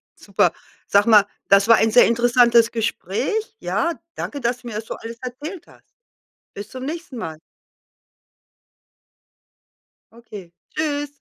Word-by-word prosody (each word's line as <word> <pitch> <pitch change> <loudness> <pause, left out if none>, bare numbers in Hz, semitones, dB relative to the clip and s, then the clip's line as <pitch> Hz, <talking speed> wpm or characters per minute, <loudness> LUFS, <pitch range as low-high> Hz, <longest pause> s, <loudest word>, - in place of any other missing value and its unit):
Super. - - +1 0.4
Sag 200 0 +4
mal, 210 -3 +6 0.2
das 200 +1 +5
war 230 - +8
ein 220 0 +2
sehr 245 +2 +6
interessantes 235 0 +4
Gespräch. 235 - -2
Ja, 340 0 -1 0.2
danke, 285 - -5
dass 245 +1 -1
du 245 - -12
mir 225 - -6
das 215 +1 -5
so - - -6
alles 230 +1 -9
erzählt 295 +8 -7
hast. - - -20 0.7
Bis 205 +1 -8
zum 260 0 -7
nächsten 325 -2 -6
Mal. 160 -8 -6 2.7
Okay, 210 -7 -12 0.2
tschüss. 290 -2 -1
235 Hz, 135 wpm, -21 LUFS, 215-285 Hz, 2.7 s, war